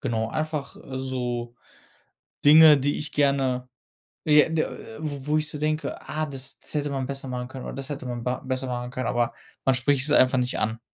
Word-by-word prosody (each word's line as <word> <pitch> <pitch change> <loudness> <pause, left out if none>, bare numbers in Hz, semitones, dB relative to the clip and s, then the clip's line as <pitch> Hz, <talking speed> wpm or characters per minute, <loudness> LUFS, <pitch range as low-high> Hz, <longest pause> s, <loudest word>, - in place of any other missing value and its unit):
genau, 110 -1 -1
einfach, 155 -3 -3
äh, 130 -1 -7
so 125 -2 -3 0.9
Dinge, 150 0 +9
die 145 +2 0
ich 150 - -4
gerne, 135 -3 +1 0.6
j 150 -1 +6
d 155 - +3
äh, 110 - -7
w 145 -3 -5
wo 150 +1 +2
ich 155 0 0
so 150 - -6
denke: 155 +1 -2
„Ah, 155 +1 -1
das, 135 -3 -6
das - - -9
hätte 145 -1 0
man 135 -2 -2
besser 135 -1 -5
machen 125 -1 -4
können, 130 0 -8
oder - - -5
das 135 +1 -6
hätte 140 -3 -5
man 120 -1 -4
ba 125 0 -1
besser 130 0 -2
machen 125 0 -3
können“, 130 0 -3
aber 120 -1 0 0.3
man 135 - +5
spricht 130 +1 +2
es 150 - +3
einfach 130 -1 +5
nicht 125 0 -1
an. 110 +1 -1
135 Hz, 215 wpm, -25 LUFS, 125-150 Hz, 0.9 s, Dinge